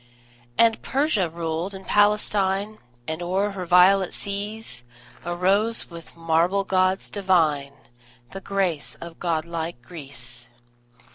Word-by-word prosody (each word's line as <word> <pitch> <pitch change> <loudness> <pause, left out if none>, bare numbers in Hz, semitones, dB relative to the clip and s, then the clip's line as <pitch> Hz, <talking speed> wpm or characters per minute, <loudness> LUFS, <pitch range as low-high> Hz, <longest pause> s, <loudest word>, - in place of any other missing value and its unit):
And 225 -1 +4
Persia 265 - +1
ruled 165 +3 -3
and 190 - -10
Palestine; 205 0 +2 0.3
And 160 +2 -3
o'er 190 +4 0
her 185 -3 -6
violet 180 +2 +5
seas 205 - -5 0.4
Arose, 190 +6 +1
with 170 0 -11
marble 165 +4 +2
gods 185 0 +1
divine, 160 -8 +1 0.6
The 195 - -6
grace 185 -6 -1
of 170 -1 -10
god 165 -2 -1
like 170 -4 -4
Greece. 120 -5 -9
185 Hz, 115 wpm, -24 LUFS, 165-200 Hz, 0.6 s, violet